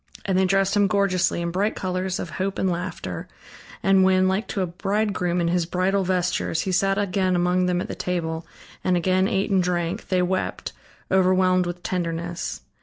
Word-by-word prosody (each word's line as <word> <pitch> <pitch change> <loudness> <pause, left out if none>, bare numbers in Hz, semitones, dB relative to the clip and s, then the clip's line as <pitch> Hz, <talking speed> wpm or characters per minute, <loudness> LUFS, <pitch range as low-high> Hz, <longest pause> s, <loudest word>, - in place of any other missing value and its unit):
And 190 - 0
they 190 +1 +4
dressed 195 +1 +2
him 205 -1 +4
gorgeously, 185 -3 +1
in 170 - -2
bright 200 +5 0
colors 185 0 -2
of - - -5
hope 195 0 -1
and 190 - +1
laughter, 175 +1 -5 0.6
and 195 -1 +5
when, 185 0 +4
like 190 +4 0
to 195 - -2
a - - +1
bridegroom 190 0 -1
in 170 -1 +1
his 175 -1 +1
bridal 190 +3 +1
vestures, 180 -3 0
he 190 - -2
sat 195 +2 +2
again 190 -2 +1
among 180 +1 +2
them 180 0 +1
at - - -4
the - - -5
table, 165 -2 -3 0.4
and 180 -1 +2
again 185 +2 +2
ate 200 -2 0
and 190 -1 +4
drank, 175 -1 -2
they 185 -1 +2
wept, 185 +1 -2 0.4
overwhelmed 185 -1 +3
with 175 0 -6
tenderness. 170 -1 -3
185 Hz, 185 wpm, -24 LUFS, 175-190 Hz, 0.6 s, and